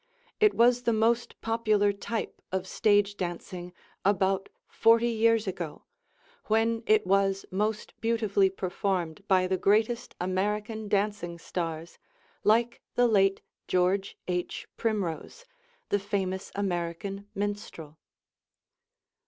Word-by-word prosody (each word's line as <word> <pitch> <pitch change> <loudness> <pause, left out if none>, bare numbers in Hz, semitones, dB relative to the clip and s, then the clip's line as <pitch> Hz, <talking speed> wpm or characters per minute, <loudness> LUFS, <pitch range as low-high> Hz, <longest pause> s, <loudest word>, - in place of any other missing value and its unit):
It 425 -1 +4
was 240 +1 +4
the 235 -1 +1
most 230 +2 +1
popular 215 -3 +2
type 220 +3 -4
of 190 0 -1
stage 205 0 +2
dancing 175 0 -5 0.3
about 195 0 +1 0.2
forty 230 +1 +4
years 225 -1 +3
ago, 175 -5 -5 0.6
when 225 +1 +2
it 215 -2 +4
was 195 0 +2
most 210 +3 -1
beautifully 215 -4 +2
performed 185 -1 -2
by 185 -2 +4
the 185 0 0
greatest 220 +5 +1
American 210 +4 -2
dancing 200 -4 -1
stars 165 -1 -5 0.4
like 230 +3 +2
the 245 - +4
late 195 -3 +3 0.3
George 185 +2 +1
H. 180 -1 -3
Primrose, 215 - -3 0.4
the 205 - +2
famous 195 -2 -3
American 195 +1 -3
minstrel. 200 -7 -5
200 Hz, 110 wpm, -28 LUFS, 185-220 Hz, 0.6 s, It